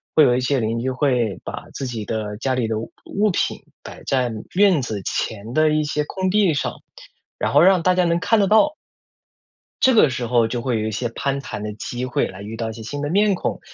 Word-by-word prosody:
会 155 Hz, -, +7 dB
有 125 Hz, -3 st, +4 dB
一 125 Hz, -, 0 dB
些 135 Hz, +1 st, +1 dB
邻 115 Hz, 0 st, -1 dB
居 130 Hz, +3 st, -1 dB
会 125 Hz, -, 0 dB
把 -, -, -7 dB
自 135 Hz, -, -4 dB
己 115 Hz, -3 st, -5 dB
的 105 Hz, -1 st, -3 dB
家 130 Hz, +2 st, -1 dB
里 125 Hz, -3 st, 0 dB
的 110 Hz, -1 st, -1 dB
物 115 Hz, -, -7 dB
物 205 Hz, 0 st, +1 dB
品 -, -, -1 dB, 0.3 s
摆 -, -, -10 dB
在 125 Hz, -3 st, +1 dB, 0.2 s
院 190 Hz, -6 st, +4 dB
子 110 Hz, -4 st, -4 dB
前 110 Hz, +4 st, -3 dB
的 155 Hz, +2 st, +4 dB
一 155 Hz, 0 st, +1 dB
些 150 Hz, 0 st, -1 dB
空 185 Hz, +4 st, -2 dB
地 195 Hz, -3 st, +3 dB
上， 145 Hz, -, -1 dB, 0.6 s
然 -, -, -1 dB
后 -, -, +6 dB
让 185 Hz, 0 st, +5 dB
大 185 Hz, +1 st, +3 dB
家 180 Hz, -, +3 dB
能 170 Hz, 0 st, +1 dB
看 225 Hz, +4 st, +2 dB
得 200 Hz, -, +3 dB
到。 300 Hz, +10 st, +4 dB, 1.1 s
这 260 Hz, -1 st, +5 dB
个 155 Hz, -, +5 dB
时 120 Hz, -1 st, -3 dB
候 120 Hz, -1 st, +3 dB
就 120 Hz, +1 st, -3 dB
会 120 Hz, -2 st, -1 dB
有 110 Hz, -, -2 dB
一 -, -, -3 dB
些 115 Hz, +3 st, -2 dB
攀 140 Hz, +4 st, -2 dB
谈 120 Hz, -6 st, -6 dB
的 105 Hz, 0 st, -4 dB
机 120 Hz, +4 st, -5 dB
会 125 Hz, -, 0 dB
来 95 Hz, +2 st, -10 dB
遇 110 Hz, +2 st, -7 dB
到 115 Hz, 0 st, -3 dB
一 -, -, -6 dB
些 110 Hz, 0 st, -9 dB
新 145 Hz, +6 st, -5 dB
的 145 Hz, -, -2 dB
面 205 Hz, +4 st, +3 dB
孔， 180 Hz, -, -3 dB
130 Hz, 260 characters per minute, -21 LUFS, 115-170 Hz, 1.1 s, 会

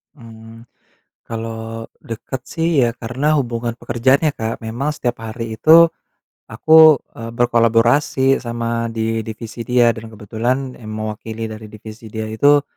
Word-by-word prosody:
Mmm. 115 Hz, -2 st, -13 dB, 0.6 s
Kalau, 115 Hz, 0 st, -6 dB, 0.2 s
dekat 120 Hz, +3 st, -6 dB
sih 165 Hz, 0 st, 0 dB, 0.2 s
iya. 120 Hz, -, +1 dB
Karena 130 Hz, +7 st, 0 dB
hubungan 120 Hz, -2 st, -3 dB
pekerjaan 130 Hz, +4 st, +2 dB
ya -, -, +2 dB
Kak, 110 Hz, +1 st, -4 dB
memang 125 Hz, +7 st, -3 dB
setiap 120 Hz, -4 st, -3 dB
hari 110 Hz, 0 st, -6 dB
itu, 165 Hz, +6 st, +7 dB, 0.6 s
aku, 130 Hz, +8 st, -2 dB, 0.4 s
eee, 115 Hz, 0 st, -7 dB
berkolaborasi 120 Hz, +3 st, +3 dB
sama 115 Hz, -1 st, -3 dB
di 115 Hz, 0 st, -2 dB
divisi 115 Hz, +1 st, -8 dB
dia, 120 Hz, -1 st, +4 dB
dan 110 Hz, 0 st, -9 dB
kebetulan 120 Hz, +5 st, -2 dB
yang 110 Hz, -, -10 dB
mewakili 110 Hz, +1 st, -5 dB
dari 110 Hz, 0 st, -9 dB
divisi 110 Hz, +1 st, -11 dB
dia 110 Hz, +1 st, -5 dB
itu, 145 Hz, +6 st, +4 dB
115 Hz, 135 wpm, -19 LUFS, 110-125 Hz, 0.6 s, itu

